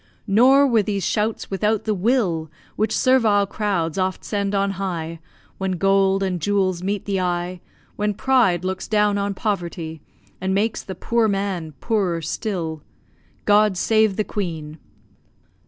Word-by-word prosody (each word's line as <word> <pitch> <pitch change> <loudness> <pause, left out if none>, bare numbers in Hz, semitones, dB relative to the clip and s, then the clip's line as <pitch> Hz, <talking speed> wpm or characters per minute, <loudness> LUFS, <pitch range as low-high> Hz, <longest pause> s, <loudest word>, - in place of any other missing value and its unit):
Nor 255 +7 +5
were 235 -5 +3
these 200 -2 -2
shouts 215 0 -1
without 210 +2 0
the 215 - 0
will, 190 -6 0 0.3
Which 215 0 0
servile 225 -6 +4
crowds 195 -5 -1
oft 185 0 -2
send 200 -1 -1
on 200 0 +1
high, 165 -3 -3 0.4
When 190 -1 -1
gold 195 +1 +2
and 180 -3 -2
jewels 190 -1 +1
meet 200 +1 -2
the 195 -2 -1
eye, 175 0 -2 0.4
When 210 0 0
pride 205 -9 +2
looks 190 0 -3
down 210 -1 +2
on 200 0 -2
poverty, 170 -6 -3 0.4
And 190 +1 0
makes 215 +3 0
the 190 - -7
poor 230 +4 +1
man 195 -6 -2
poorer 190 -7 0
still! 165 -3 -3 0.6
God 210 -2 +4
save 220 0 +3
the 215 - 0
Queen! 160 -7 -5
195 Hz, 145 wpm, -22 LUFS, 180-210 Hz, 0.6 s, Nor